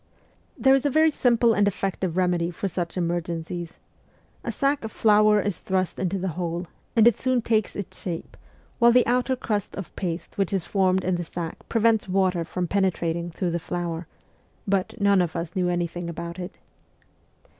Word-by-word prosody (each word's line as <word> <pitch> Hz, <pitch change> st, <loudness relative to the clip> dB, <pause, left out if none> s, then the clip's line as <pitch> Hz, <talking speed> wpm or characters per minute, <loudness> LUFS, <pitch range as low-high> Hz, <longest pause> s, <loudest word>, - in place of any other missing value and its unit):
There 265 Hz, 0 st, +5 dB
is 270 Hz, -, +3 dB
a 290 Hz, -, +2 dB
very 315 Hz, +3 st, +4 dB
simple 235 Hz, -4 st, +3 dB
and 205 Hz, -1 st, +3 dB
effective 190 Hz, -3 st, -2 dB
remedy 175 Hz, -2 st, +1 dB
for 180 Hz, +3 st, -3 dB
such 175 Hz, -1 st, -4 dB
emergencies. 170 Hz, 0 st, -3 dB, 0.7 s
A -, -, -2 dB
sack 275 Hz, -1 st, 0 dB
of 220 Hz, -, -5 dB
flour 210 Hz, -1 st, +4 dB
is 205 Hz, -3 st, -2 dB
thrust 185 Hz, -1 st, -1 dB
into 190 Hz, +1 st, -1 dB
the 190 Hz, 0 st, -2 dB
hole, 175 Hz, 0 st, -2 dB, 0.3 s
and 225 Hz, 0 st, +6 dB
it 240 Hz, -, +4 dB
soon 255 Hz, -2 st, +1 dB
takes 220 Hz, -3 st, +1 dB
its 200 Hz, -, -6 dB
shape, 170 Hz, -3 st, -5 dB, 0.4 s
while 235 Hz, -1 st, +7 dB
the 250 Hz, +1 st, +5 dB
outer 250 Hz, +2 st, +1 dB
crust 210 Hz, -5 st, -2 dB
of 195 Hz, -, -7 dB
paste 170 Hz, 0 st, -4 dB
which 195 Hz, 0 st, +1 dB
is 190 Hz, -4 st, 0 dB
formed 190 Hz, -2 st, +2 dB
in 185 Hz, -, 0 dB
the 175 Hz, -, -3 dB
sack 165 Hz, 0 st, -7 dB
prevents 225 Hz, -3 st, +2 dB
water 185 Hz, -2 st, +2 dB
from 180 Hz, +1 st, -3 dB
penetrating 170 Hz, -3 st, 0 dB
through 175 Hz, +1 st, -2 dB
the 170 Hz, -, -1 dB
flour; 170 Hz, -1 st, -4 dB, 0.6 s
but 200 Hz, +3 st, 0 dB
none 200 Hz, -2 st, +4 dB
of 175 Hz, -3 st, -2 dB
us 170 Hz, 0 st, -4 dB
knew 180 Hz, -1 st, +1 dB
anything 175 Hz, 0 st, -2 dB
about 170 Hz, +1 st, -6 dB
it. 180 Hz, +1 st, -7 dB
185 Hz, 180 wpm, -25 LUFS, 175-215 Hz, 0.7 s, while